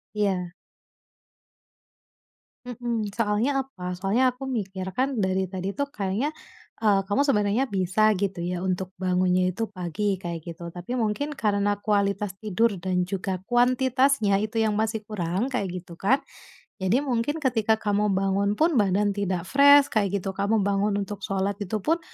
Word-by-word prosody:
Iya. 190 -4 0 2.1
Mhm. 235 -4 -3
Soalnya 230 +5 +1
apa? 180 -9 -6
Soalnya 220 +8 +1
aku 260 +2 -8
mikir 190 -5 -3
kan 260 +8 -1
dari 190 0 +1
tadi 190 +1 -4
tuh 285 - +1
kayaknya, 210 +10 -1 0.5
eee, 205 -3 +4
kamu 205 +8 +2
sebenarnya 210 -1 +2
bisa 195 +2 +2
gitu 195 -3 -2
ya 175 +1 -2
untuk 185 0 -2
bangunnya 185 0 +2
itu 225 +1 -3
pagi, 190 +1 -2
kayak 170 -3 -5
gitu, 170 +1 -8
tapi 180 +9 -4
mungkin 230 +6 -1
karena 205 -1 +1
kualitas 205 -1 0
tidur 215 +1 +1
dan 180 -1 0
juga 190 -1 -3
kuantitasnya 250 -2 +3
itu 220 +2 -2
yang 220 -2 +2
masih 220 0 -1
kurang, 190 +1 -2
kayak 200 -7 -1
gitu 175 -1 -12
kan, 260 +8 +3 0.6
jadi 210 +9 +2
mungkin 265 +3 -1
ketika 225 -4 +2
kamu 210 -2 0
bangun 195 +1 +1
pun 320 +7 +2
badan 205 0 +2
tidak 190 -3 -2
fresh 285 +6 +6
kayak 200 -3 +1
gitu, 195 0 -2
kamu 200 +2 +1
bangun 200 +1 +1
untuk 200 0 -7
sholat, 195 +1 -2
itu 205 +1 -2
pun 330 +2 +2
205 Hz, 150 wpm, -25 LUFS, 190-230 Hz, 2.1 s, fresh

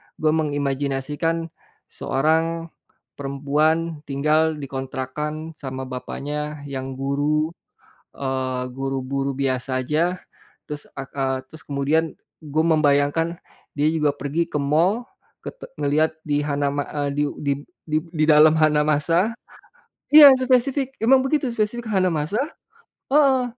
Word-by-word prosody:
gue 155 0 +1
mengimajinasikan 145 +2 -1 0.4
seorang 160 +4 0 0.5
perempuan 150 +4 0
tinggal 155 +3 +2
dikontrakkan 140 +3 -5
sama 130 -1 -5
bapaknya 145 +3 -5
yang 135 -1 -5
guru, 145 +4 0 0.6
eee, 130 -2 -2
guru 135 0 -2
buru 135 +1 -2
biasa 130 -1 -1
aja, 170 +7 0 0.5
terus 150 0 -7
ak 135 -1 -7
ah 135 -1 0
terus 160 +4 -13
kemudian 150 +3 0 0.3
gue 155 +1 0
membayangkan 155 +1 +2 0.4
dia 145 +1 +2
juga 150 -3 +1
pergi 145 +5 -1
ke - - -11
mall, 165 +11 +2 0.4
kete - - -8
ngelihat 155 +2 +1
di 145 -1 0
Hanama 145 -1 -1
eee, 145 -1 0
diu 145 0 +1
dib 140 -1 0 0.3
dib 155 0 0
didalam 155 0 +6
Hanamasa 155 +6 +2 0.8
iya, 295 -3 +11
spesifik, 260 +1 +1
emang 260 +4 +5
begitu 280 -1 +1
spesifik 230 +2 -2
Hanamasa 185 0 +1 0.7
heeh 270 -2 +4
150 Hz, 110 wpm, -23 LUFS, 140-165 Hz, 0.8 s, iya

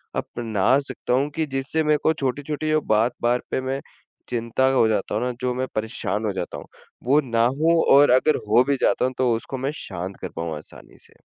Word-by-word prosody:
अपना 115 +1 0
सकता - - -3
हूँ 140 +3 +2
कि 160 -1 0
जिससे 135 +4 -1
मेरे 150 0 +3
को 160 - +3
छोटी-छोटी 145 +3 -2
बात 110 +3 +2
बार 120 +1 +2
पे - - 0
मैं 130 +1 -3 0.5
चिंता 120 +1 0
हो 125 -4 +4
जाता 105 -2 -1
हूँ 125 +4 0
न, - - -3
जो 125 -1 0
मैं 130 +1 -2
परेशान 110 -1 -1
हो 105 - -1
जाता 95 -2 -4
हूँ - - -10 0.4
वो 140 +4 +4
ना 115 -3 +1
होऊँ 160 +6 +2
और 145 +1 +6
अगर 130 +5 +4
हो 115 +4 +5
भी 140 - +2
जाता - - +2
हूँ 130 - -1
तो 125 -2 +2
उसको 130 +4 -5
मैं 135 +2 -2
शांत 95 - -6
कर - - -4
पाऊँ 80 -1 -3
आसानी 75 - -14
से? - - -19
125 Hz, 210 wpm, -23 LUFS, 110-140 Hz, 0.5 s, और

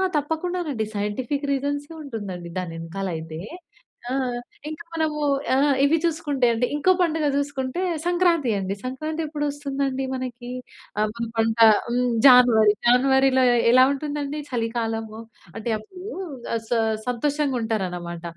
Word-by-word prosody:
తప్పకుండానండి. 320 -4 -1
సైంటిఫిక్ 245 +8 -2
రీజన్సే 285 +3 -2
ఉంటుందండి. 195 -9 -6
దానెనకాల 170 +2 -4
అయితే. 160 0 -6 0.7
ఆ! - - -3 0.6
ఇంకా 310 +2 -7
మనము 315 -2 -1 0.4
ఆహ్, 280 +1 +4
ఇవి 295 +4 +4
చూసుకుంటే 300 -6 0
అండి 230 +2 +1
ఇంకో 330 +6 +3
పండుగ 320 -3 +1
చూసుకుంటే 285 +2 -2 0.2
సంక్రాంతి 345 -7 +2
అండి. 195 +1 -3
సంక్రాంతి 310 +5 -3
ఎప్పుడు 295 -1 -3
వస్తుందండి 275 -2 -2
మనకి? 250 -1 -5 0.5
ఆ! - - +3
మన 235 0 -3
పంట 225 0 +1 0.3
హ్మ్. 245 +1 +1 0.2
జాన్వరి. 240 -5 +7
జాన్వరిలో 265 +1 +4
ఎ - - +3
ఎలా 255 +1 +7
ఉంటుందండి? 290 +1 -4
చలికాలము, 225 -2 -3 0.4
అంటే 225 +1 -3
అప్పుడు 360 - -12 0.5
ఆహ్, 230 - -1
స - - -20 0.4
సంతోషంగా 280 +2 0
ఉంటారనమాట. 180 -6 -3
260 Hz, 125 wpm, -24 LUFS, 225-295 Hz, 0.7 s, జాన్వరి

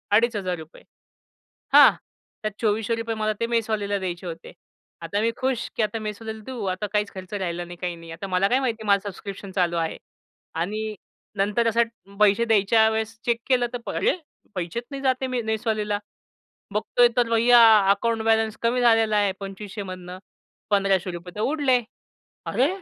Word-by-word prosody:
अडीच 230 +2 +3
हजार 185 -3 -2
रुपये. 160 0 -13 0.9
हां. - - +9 0.5
त्यात 215 - -1
₹2,400 225 +1 0
मला 215 0 0
ते 230 - +1
मेसवाल्याला 215 -3 0
द्यायचे 180 -1 -4
होते. 165 -1 -8 0.5
आता 200 +5 -2
मी 230 - +2
खुश, 260 -2 -1
की 225 - +1
आता 215 +1 -2
मेसवाल्याला 220 +1 -6
देऊ 250 -5 -5
आता 210 +3 -4
काहीच 210 -1 0
खर्च 185 0 -9
राहिला 175 -3 -2
नाही 175 0 -10
काही 180 -1 -2
नाही. 165 -1 -11
आता 170 +4 -6
मला 185 +1 +2
काय 255 - +3
माहिती 235 -4 -2
आहे - - -8
माझं 200 0 +2
सबस्क्रिप्शन 200 0 -8
चालू 180 -2 +1
आहे. 165 -1 -2 0.6
आणि 215 +6 -2 0.4
नंतर 210 +4 +1
असं 230 -3 -1
पैसे 210 +2 +4
द्यायच्या 220 0 +4
वेळेस 220 0 -2
चेक 235 -1 +1
केलं 250 -2 +3
तर 240 -1 -5
अरे 485 - +2 0.4
पैसेच 180 +6 -3
नाही 275 -1 -5
जात 260 -1 +3
आहे 265 - 0
मी 250 -1 -1
मेसवाल्याला. 215 -2 -1 0.7
बघतोय 240 +3 +3
तर 240 -1 +3
भय्या 235 +1 +6 0.3
अकाउंट 225 +3 0
बॅलन्स 225 -1 +2
कमी 240 +2 +1
झालेला 225 -3 +4
आहे. 205 -1 +3
2,500मधनं 190 -2 -7 0.5
₹1,500 185 -3 0
तर 210 - -3
उडले. 275 -1 +2 0.7
"अरे! 260 +3 +2
215 Hz, 165 wpm, -24 LUFS, 195-230 Hz, 0.9 s, हां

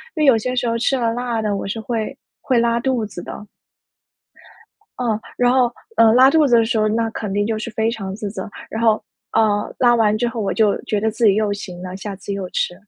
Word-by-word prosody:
因 315 - -1
为 - - +4
有 265 -5 +6
些 250 +3 -3
时 245 -1 0
候 230 0 0
吃 245 +3 +1
了 230 -2 0
辣 240 -1 -2
的， 210 -2 -1
我 195 - -4
是 210 +3 -3
会 230 +3 -3 0.2
会 255 - +1
拉 235 0 +2
肚 245 -2 0
子 195 -4 -8
的。 210 - -8 1.5
嗯， 230 -4 0 0.2
然 245 0 +3
后， 250 -2 +3 0.2
呃， 225 -1 +6
拉 255 +3 +7
肚 310 +2 +4
子 240 -3 +4
的 230 - +4
时 230 +1 -1
候， 215 0 +2
那 225 +1 0
肯 210 -2 -5
定 205 +1 0
就 225 0 -1
是 220 - -5
非 220 0 0
常 195 -5 -5
自 210 -1 -4
责。 220 0 -6 0.2
然 225 - -4
后， 220 -2 +3 0.3
呃， 210 -2 +1
拉 240 -1 +5
完 215 -2 +3
之 240 - +1
后 235 -1 -5
我 200 - -1
就 215 -3 +2
觉 210 - -1
得 220 - +1
自 225 +2 -1
己 205 -3 +6
又 215 -1 +1
行 185 -3 -7
了， 185 0 -6
下 195 0 -6
次 200 +1 -6
又 195 -2 -4
吃。 - - -1
225 Hz, 265 characters per minute, -20 LUFS, 210-240 Hz, 1.5 s, 拉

